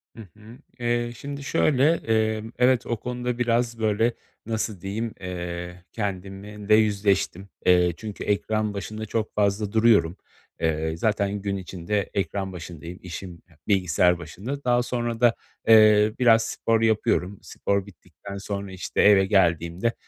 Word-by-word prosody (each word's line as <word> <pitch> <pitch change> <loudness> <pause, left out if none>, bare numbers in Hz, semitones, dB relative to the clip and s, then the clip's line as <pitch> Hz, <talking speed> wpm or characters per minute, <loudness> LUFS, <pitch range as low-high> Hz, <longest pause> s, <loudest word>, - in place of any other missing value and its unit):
Hı 115 - -9 0.2
hı. 110 +4 -13 0.2
Eee, 120 0 0
şimdi 140 0 -7
şöyle, 145 +3 +3
eee, 110 -1 +1
evet 125 -1 +3
o 120 - -2
konuda 125 0 -3
biraz 120 -1 0
böyle, 110 +2 +1 0.3
nasıl 110 -4 -3
diyeyim, 110 +4 -3
eee, 90 -1 -6
kendimle 100 +2 -2
yüzleştim, 100 -3 +1 0.2
eee, 90 -1 +4
çünkü 105 -2 -7
ekran 105 +1 0
başında 110 +2 -5
çok 110 +1 -3
fazla 100 0 +1
duruyorum. 110 -6 +3 0.4
Eee, 80 0 -1
zaten 100 0 0
gün 100 -1 -2
içinde 95 +2 -3
ekran 95 +1 -2
başındayım, 85 0 -8
işim 90 -1 -8 0.3
bilgisayar 90 -3 +3
başında. 110 - -6
Daha 120 0 +2
sonra 120 -2 -3
da, 120 -1 +5 0.3
eee, 110 -1 +6
biraz 115 -2 +5
spor 115 0 0
yapıyorum. 105 -3 +1
Spor 100 -1 -2
bittikten 100 0 -11
sonra, 100 -1 -5
işte, 95 - -2
eve 100 -2 +6
geldiğimde, 90 +2 +1
105 Hz, 135 wpm, -25 LUFS, 95-115 Hz, 0.4 s, eee